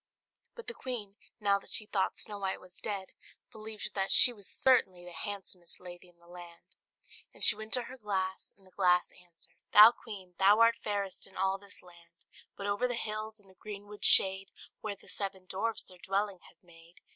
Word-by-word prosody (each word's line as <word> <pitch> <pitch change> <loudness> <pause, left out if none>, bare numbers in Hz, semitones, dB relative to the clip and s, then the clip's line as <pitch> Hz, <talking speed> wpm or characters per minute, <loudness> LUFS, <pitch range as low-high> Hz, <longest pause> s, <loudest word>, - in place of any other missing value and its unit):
But 470 - -11
the 470 - -6
queen, 220 - -6 0.2
now 200 -2 +1
that - - -17
she 215 - +3
thought 195 -3 -3
Snow 205 -1 -5
White 190 -1 -4
was 180 -1 -12
dead, 195 -3 -5 0.4
believed 215 -1 -8
that 195 -1 0
she 245 - +11
was 205 -4 -9
certainly 190 -9 +1
the 175 - -11
handsomest 190 -2 -7
lady 180 0 -13
in 175 - -28
the 170 - -26
land; 175 -1 -15 0.6
and - - -2
she - - +8
went 215 +1 -11
to 250 - +3
her 260 +3 -12
glass, 190 -3 -4
and 195 - -19
the 185 - -22
glass 180 -2 +1
answered, 175 -2 -17 0.2
"Thou, 210 +2 +9
Queen, 200 -6 -12
thou 200 +3 +4
art 230 0 +3
fairest 200 -2 -5
in 190 - -16
all 190 +1 -1
this 200 0 -11
land; 170 -1 -21 0.3
But 200 - -7
over 205 +5 -1
the 245 - -4
hills, 215 -1 -6
in 200 - -26
the 190 - -21
greenwood 205 +2 -12
shade. 190 0 +6 0.3
Where 210 -2 -6
the - - -23
seven 195 -2 -6
dwarfs 215 +5 -4
their 180 -1 -17
dwelling 195 0 -3
have - - -26
made. 170 0 -21
195 Hz, 200 wpm, -29 LUFS, 185-215 Hz, 0.6 s, she